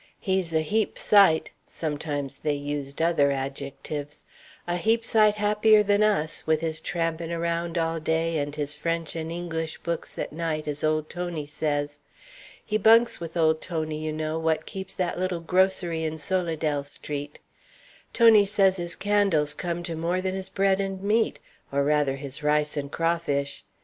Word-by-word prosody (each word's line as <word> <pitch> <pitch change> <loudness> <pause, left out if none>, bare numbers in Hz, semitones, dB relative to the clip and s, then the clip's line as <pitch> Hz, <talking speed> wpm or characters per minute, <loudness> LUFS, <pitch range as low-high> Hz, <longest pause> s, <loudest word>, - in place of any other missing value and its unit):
He's 190 -3 0
a 160 -1 +2
heap 215 +7 0
sight" 195 -6 +4 0.2
sometimes 145 -3 -4
they 150 -1 0
used 145 +1 -3
other 165 -4 +3
adjectives 140 +2 -5 0.4
"a 175 0 -1
heap 225 +5 +1
sight 215 -2 +4
happier 210 +1 +4
than 205 0 +2
us, 195 -9 +1
with 160 -1 +2
his 160 -1 -1
trampin' 165 -1 -2
around 170 0 -2
all 165 0 0
day 160 0 0
and 145 0 -3
his 150 0 -1
French 165 +1 -2
and 160 0 -4
English 165 -2 -4
books 170 -1 -4
at - - -4
night, 155 -1 -3
as 150 0 -3
old 155 0 +1
Tony 175 -4 -4
says. 145 -1 -2 0.7
He 215 0 0
bunks 230 +3 +5
with 165 0 -6
old 160 -1 +3
Tony, 155 -3 -3
you 155 0 -3
know, 155 +1 -2
what 160 -1 0
keeps 190 0 -6
that 180 -1 -2
little 185 -2 -1
grocery 180 -2 +1
in 160 0 -2
Solidelle 160 -4 -1
Street. 145 0 -5 0.7
Tony 225 -3 +6
says 195 -1 +3
his 175 -1 -4
candles 200 -8 +2
comes 175 -1 -4
to 165 - -4
more 170 +3 -1
than 185 0 -2
his 190 0 -5
bread 195 0 +2
and 195 -1 -4
meat, 220 +3 +1 0.3
or, 140 0 +1
rather, 145 -2 +2
his 135 +1 -6
rice 150 0 +1
and 140 -1 -4
crawfish. 165 -4 -1
165 Hz, 165 wpm, -26 LUFS, 150-185 Hz, 0.7 s, Tony